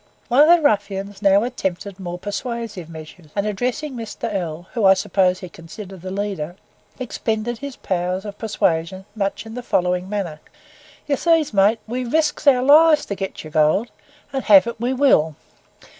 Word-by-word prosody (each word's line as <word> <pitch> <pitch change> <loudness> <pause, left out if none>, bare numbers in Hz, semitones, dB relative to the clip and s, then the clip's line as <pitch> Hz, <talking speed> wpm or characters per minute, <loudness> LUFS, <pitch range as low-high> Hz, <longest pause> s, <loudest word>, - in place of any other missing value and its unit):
One 250 +4 +5
of 300 - +7
the 340 -1 +6
ruffians 200 -4 0
now 200 0 +4
attempted 195 -5 -4
more 175 -2 -5
persuasive 210 -3 -5
measures, 160 +1 -11
and 200 0 0
addressing 250 +8 -2
Mr. 225 -3 -5
L, 175 -3 -4
whom 230 -5 0
I 190 0 +7
suppose 185 -2 +1
he 185 - -6
considered 180 +3 -11
the 185 - -6
leader, 190 -4 -4 0.4
expended 225 -1 -3
his 280 -2 -7
powers 185 +1 -2
of 205 0 -8
persuasion 190 -4 -1
much 200 +1 -2
in 220 - -9
the 250 - -5
following 180 -4 0
manner. 190 -7 -3 0.7
"You 285 -2 0
sees, 325 -3 +2
mate, 205 +3 +3
we 250 +3 -3
risks 305 +4 0
our 255 -3 +5
lives 300 +2 +6
to 200 - -4
get 195 0 -5
your 155 - -10
gold, 155 +9 +2 0.4
and 270 - -2
have 200 -2 +7
it 235 -1 -5
we 240 +2 -1
will. 250 - +3
205 Hz, 175 wpm, -21 LUFS, 185-245 Hz, 0.7 s, of